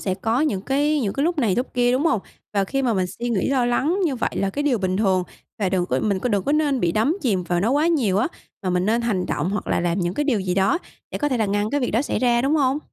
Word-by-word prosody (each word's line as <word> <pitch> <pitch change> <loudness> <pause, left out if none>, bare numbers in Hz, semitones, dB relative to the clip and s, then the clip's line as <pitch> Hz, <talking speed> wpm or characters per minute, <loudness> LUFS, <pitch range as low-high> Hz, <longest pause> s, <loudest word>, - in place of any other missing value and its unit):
sẽ 190 - -1
có 225 +6 0
những 225 -11 0
cái 290 +6 +1
những 205 -6 -1
cái 280 +2 -1
lúc 345 -1 0
này 220 -9 +2
lúc 250 +3 -3
kia, 245 0 +3
đúng 270 +5 +1
hông? 230 - +2 0.3
Và 200 -2 +1
khi 270 +7 -2
mà 240 -4 +1
mình 185 -2 +1
suy 235 +6 -5
nghĩ, 225 0 0
lo 260 -3 +2
lắng 290 +10 +1
như 285 -6 0
vậy 235 - -1
là 195 - 0
cái 290 +9 -2
điều 265 -5 +2
bình 185 -1 -1
thường 190 -3 +2 0.4
và 200 - +1
đừng 180 -1 0
có 130 - 0
mình 200 -3 +1
có 250 - -2
đừng 205 -4 +1
có 285 - +1
nên 295 -4 +1
bị 170 -3 +1
đắm 230 - +1
chìm 200 -8 +1
vào 175 0 0
nó 220 +5 +1
quá 295 +4 +2
nhiều 240 - +2
á, 220 - +1 0.3
mà 185 - -1
mình 180 +2 0
nên 230 +2 +2
hành 205 -6 -1
động 155 +6 -1
hoặc 210 - -3
là - - 0
làm 175 +2 0
những 175 0 -1
cái 295 - 0
điều 240 -8 +1
gì 185 -1 -1
đó 195 - +2 0.3
để - - -4
có 295 - 0
thể 260 - 0
là 220 - +1
ngăn 205 +2 0
cái 290 - 0
việc 245 - -1
đó 230 +5 +1
xảy - - -2
ra, 240 -1 +2
đúng 275 +3 +2
hông? 275 -1 +2
230 Hz, 315 wpm, -22 LUFS, 190-275 Hz, 0.4 s, kia